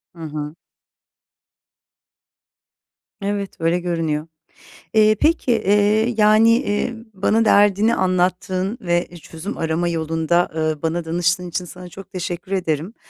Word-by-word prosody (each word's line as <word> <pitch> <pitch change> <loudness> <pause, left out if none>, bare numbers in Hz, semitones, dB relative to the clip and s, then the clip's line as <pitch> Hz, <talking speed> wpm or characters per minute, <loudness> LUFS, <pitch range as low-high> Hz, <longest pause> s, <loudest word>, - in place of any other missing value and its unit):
Hı 165 - -10
hı. 150 0 -5 2.7
Evet, 200 0 -3
öyle 165 +2 +1
görünüyor. 165 -3 -2 0.7
Eee, 215 0 +5
peki, 310 -5 +2
eee, 215 +2 +2
yani, 215 +1 +5
eee, 240 -1 -2 0.2
bana 215 +4 +2
derdini 205 +2 +4
anlattığın 185 +3 0
ve 175 -3 0
çözüm 165 +5 -7
arama 165 +2 -1
yolunda, 165 +1 0
ııı, 155 -2 -1
bana 165 +1 -1
danıştığın 175 +2 0
için 175 +2 -3
sana 180 +1 -10
çok 195 +2 -12
teşekkür 180 0 -5
ederim. 175 +1 -2
180 Hz, 115 wpm, -20 LUFS, 165-205 Hz, 2.7 s, Eee